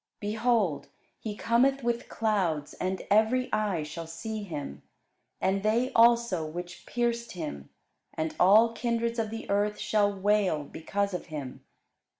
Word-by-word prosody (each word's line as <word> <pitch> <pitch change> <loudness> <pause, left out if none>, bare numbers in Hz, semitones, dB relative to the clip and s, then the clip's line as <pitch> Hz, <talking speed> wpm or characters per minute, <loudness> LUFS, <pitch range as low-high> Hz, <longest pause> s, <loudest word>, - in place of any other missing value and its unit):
Behold, 215 -5 0 0.3
he 215 -2 -5
cometh 260 +4 +2
with 235 0 -1
clouds; 185 -10 0
and 185 +1 -3
every 220 +5 +3
eye 205 -7 0
shall 160 +2 -7
see 215 +7 -5
him, 145 - -6 0.6
and 195 +1 +1
they 225 +5 +1
also 235 -6 +4
which 175 +3 -7
pierced 235 -1 -1
him: 70 - -6 0.5
and 160 0 -2
all 215 +5 +6
kindreds 235 0 -1
of 220 -1 -1
the 225 +1 -6
earth 205 +1 +1
shall 210 -1 +2
wail 200 -5 +1
because 200 +7 -3
of 180 - -4
him. 145 -5 -7
205 Hz, 140 wpm, -28 LUFS, 175-230 Hz, 0.6 s, all